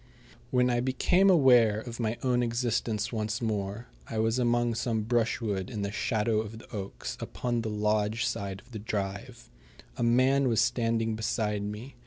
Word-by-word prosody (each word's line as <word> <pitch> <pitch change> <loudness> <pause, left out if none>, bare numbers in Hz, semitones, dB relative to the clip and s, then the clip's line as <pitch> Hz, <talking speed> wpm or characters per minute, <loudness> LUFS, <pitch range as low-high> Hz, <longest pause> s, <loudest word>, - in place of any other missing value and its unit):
When 125 -1 +3
I 120 - +1
became 155 +10 +3
aware 125 - +5
of 115 +1 -8
my 115 0 -1
own 125 -2 +2
existence 115 -1 -1
once 110 0 -2
more 105 0 -3 0.2
I 110 - -4
was 115 +3 +1
among 120 -1 +2
some 115 -1 -1
brushwood 110 -3 0
in 105 -5 -4
the 100 - -2
shadow 110 0 0
of 110 0 -8
the 115 - -13
oaks 100 -1 -5
upon 120 -2 -2
the 110 - -3
lodge 105 +2 0
side 95 -1 -3
of 125 - -23
the 110 - -6
drive. 100 -2 -5 0.5
A - - -1
man 130 +3 +3
was 115 -4 +2
standing 115 -2 +1
beside 105 -1 -1
me. 105 +6 -6
115 Hz, 170 wpm, -29 LUFS, 105-120 Hz, 0.5 s, aware